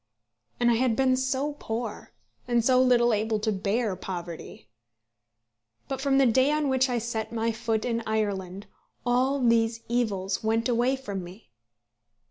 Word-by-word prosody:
And 240 0 +4
I 230 - +2
had 245 -2 +2
been 260 0 +3
so 265 +3 -1
poor; 225 -1 -5 0.4
and 240 -2 +1
so 255 0 +5
little 240 -2 +4
able 215 +1 0
to 215 +1 0
bear 205 +1 -1
poverty. 175 - -7 1.2
But 270 -1 -4
from 270 -1 +2
the 275 - +5
day 260 +3 +3
on 300 -1 +1
which 260 0 +2
I 245 - 0
set 225 -1 -3
my 230 0 0
foot 225 -1 -2
in 230 -1 -1
Ireland 200 -3 -2 0.4
all 255 +3 +2
these 230 -2 +2
evils 200 -6 -1
went 225 +2 +1
away 245 +2 +2
from 205 -8 -6
me. 180 - -13
230 Hz, 155 wpm, -27 LUFS, 215-255 Hz, 1.2 s, so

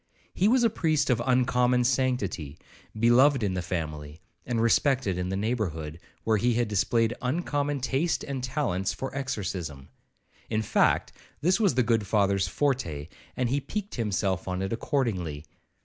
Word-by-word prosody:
He 190 - +2
was 245 +2 +4
a 230 - +5
priest 155 -9 +1
of 120 -2 +1
uncommon 125 -1 +2
sanctity, 120 - -1 0.4
beloved 125 +3 +5
in 100 -2 0
the 90 - -2
family, 75 -4 -5 0.3
and 120 -2 0
respected 115 -2 +2
in 90 0 -2
the 95 - -1
neighbourhood, 90 -8 -2 0.2
where 110 -1 +2
he 120 +3 +1
had 120 -1 +1
displayed 115 +3 +1
uncommon 145 0 -1
taste 135 +6 0
and 135 -3 -4
talents 120 -8 -1
for 135 0 -6
exorcism;—in 95 - -5
fact, - - +2 0.3
this 180 +7 +3
was 200 - +3
the 125 - +3
good 110 -3 +1
Father's 100 -3 +2
forte, 85 - -1 0.3
and 125 -2 0
he 140 +3 0
piqued 205 +6 -5
himself 100 -6 -1
on 90 +1 -2
it 95 - -2
accordingly. 95 - -2
115 Hz, 150 wpm, -27 LUFS, 95-135 Hz, 0.4 s, a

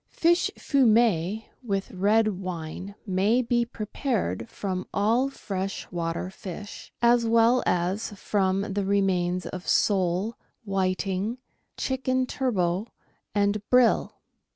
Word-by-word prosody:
Fish 345 +1 +2
fumet 220 - +3 0.2
with 200 -1 -2
red 215 +3 +3
wine 185 +1 -6
may 200 +4 +2
be 240 0 +2
prepared 215 - -3
from 185 -2 -4
all 230 +7 +2
fresh 195 -6 -4
water 170 +1 -3
fish, 195 +2 -9
as 235 -1 +4
well 230 +2 +4
as 180 +4 0
from 195 0 0
the 200 0 0
remains 185 -2 +1
of 185 0 -7
sole, 195 +2 +1 0.3
whiting, 195 +2 -1 0.4
chicken 260 -1 0
turbot, 200 -7 0 0.5
and 205 0 +2
brill. 250 -2 +4
200 Hz, 105 wpm, -26 LUFS, 185-230 Hz, 0.5 s, as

